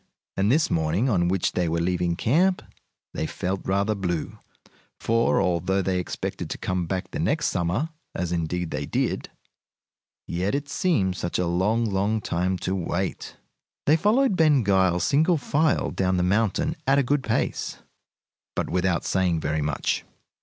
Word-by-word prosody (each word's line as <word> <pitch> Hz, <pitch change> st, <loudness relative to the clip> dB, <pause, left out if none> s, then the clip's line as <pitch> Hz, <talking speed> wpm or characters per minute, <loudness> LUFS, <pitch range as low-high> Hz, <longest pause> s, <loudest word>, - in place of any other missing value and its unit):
And 100 Hz, +3 st, +2 dB
this 155 Hz, +3 st, +2 dB
morning, 85 Hz, +10 st, +1 dB
on 90 Hz, -6 st, +2 dB
which 95 Hz, 0 st, +1 dB
they 90 Hz, -2 st, 0 dB
were 85 Hz, +1 st, 0 dB
leaving 90 Hz, 0 st, 0 dB
camp, 175 Hz, -, +2 dB, 0.5 s
they 80 Hz, -, -2 dB
felt 95 Hz, +3 st, -3 dB
rather 100 Hz, +3 st, +1 dB
blue, 90 Hz, -6 st, -3 dB, 0.6 s
for, 115 Hz, +1 st, +2 dB
although 95 Hz, +1 st, +1 dB
they 95 Hz, 0 st, 0 dB
expected 90 Hz, -, -4 dB
to -, -, -4 dB
come 90 Hz, -2 st, -2 dB
back 95 Hz, +2 st, -3 dB
the 160 Hz, -, -4 dB
next 155 Hz, -1 st, +1 dB
summer, 90 Hz, -, -1 dB, 0.3 s
as 85 Hz, -1 st, -2 dB
indeed 85 Hz, 0 st, -2 dB
they -, -, -3 dB
did, -, -, -1 dB, 1.0 s
yet 90 Hz, +7 st, -1 dB
it 145 Hz, 0 st, -3 dB
seemed 105 Hz, -, +1 dB
such 85 Hz, 0 st, -2 dB
a 90 Hz, -, +1 dB
long, 100 Hz, +7 st, +1 dB
long 105 Hz, +1 st, 0 dB
time 90 Hz, -1 st, -1 dB
to 95 Hz, -, 0 dB
wait! 95 Hz, 0 st, -3 dB, 0.5 s
They 150 Hz, -, +5 dB
followed 210 Hz, -, +3 dB
Ben 150 Hz, -6 st, +4 dB
Gile 95 Hz, -3 st, +3 dB
single 155 Hz, -, +3 dB
file 155 Hz, +2 st, +1 dB
down 95 Hz, -1 st, 0 dB
the 90 Hz, -, +1 dB
mountain 115 Hz, -, +1 dB
at 135 Hz, +1 st, +4 dB
a 140 Hz, -, +4 dB
good 145 Hz, +3 st, +1 dB
pace, 115 Hz, -4 st, -1 dB, 0.8 s
but -, -, -2 dB
without 90 Hz, -1 st, +1 dB
saying 90 Hz, -3 st, +1 dB
very 75 Hz, 0 st, -1 dB
much. 75 Hz, -1 st, -1 dB
95 Hz, 160 wpm, -25 LUFS, 90-130 Hz, 1.0 s, They